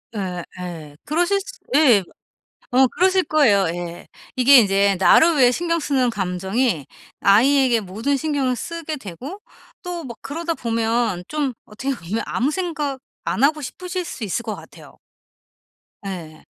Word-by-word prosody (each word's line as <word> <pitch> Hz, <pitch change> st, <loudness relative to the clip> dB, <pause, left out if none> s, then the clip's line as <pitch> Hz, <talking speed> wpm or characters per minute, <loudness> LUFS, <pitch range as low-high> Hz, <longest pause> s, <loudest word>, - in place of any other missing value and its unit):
예, 180 Hz, -4 st, -3 dB, 0.2 s
예. 160 Hz, -5 st, -8 dB
그러실 350 Hz, +6 st, +1 dB
수 -, -, -11 dB, 0.2 s
예. 250 Hz, -10 st, +6 dB, 0.7 s
어 260 Hz, +1 st, +5 dB
그러실 370 Hz, +6 st, +2 dB
거예요, 225 Hz, -12 st, +3 dB
예. 175 Hz, 0 st, -7 dB, 0.3 s
이게 255 Hz, +1 st, +7 dB
인제 200 Hz, -2 st, +3 dB
나를 320 Hz, -, +5 dB
위해 250 Hz, -2 st, +6 dB
신경 335 Hz, +4 st, 0 dB
쓰는 270 Hz, -5 st, +1 dB
감정이 190 Hz, -, -1 dB, 0.3 s
아이에게 250 Hz, +4 st, +4 dB
모든 220 Hz, +9 st, -2 dB
신경을 275 Hz, -4 st, -1 dB
쓰게 330 Hz, +2 st, -5 dB
되고 265 Hz, -, -8 dB, 0.5 s
또 350 Hz, -1 st, -4 dB
막 235 Hz, -3 st, -8 dB
그러다 335 Hz, +3 st, -3 dB
보면 230 Hz, -, -1 dB
좀 295 Hz, -3 st, -1 dB
어떻게 265 Hz, +6 st, -3 dB
보면 210 Hz, +1 st, -4 dB
아무 255 Hz, +5 st, 0 dB
생각 305 Hz, -6 st, -3 dB, 0.3 s
안 255 Hz, -, 0 dB
하고 300 Hz, +1 st, +2 dB
싶으실 360 Hz, +6 st, -5 dB
수 245 Hz, -8 st, -6 dB
있을 205 Hz, +4 st, -2 dB
것 220 Hz, -2 st, -4 dB
같아요. -, -, -14 dB, 1.1 s
예. 165 Hz, -5 st, -7 dB
250 Hz, 270 characters per minute, -21 LUFS, 200-305 Hz, 1.1 s, 이게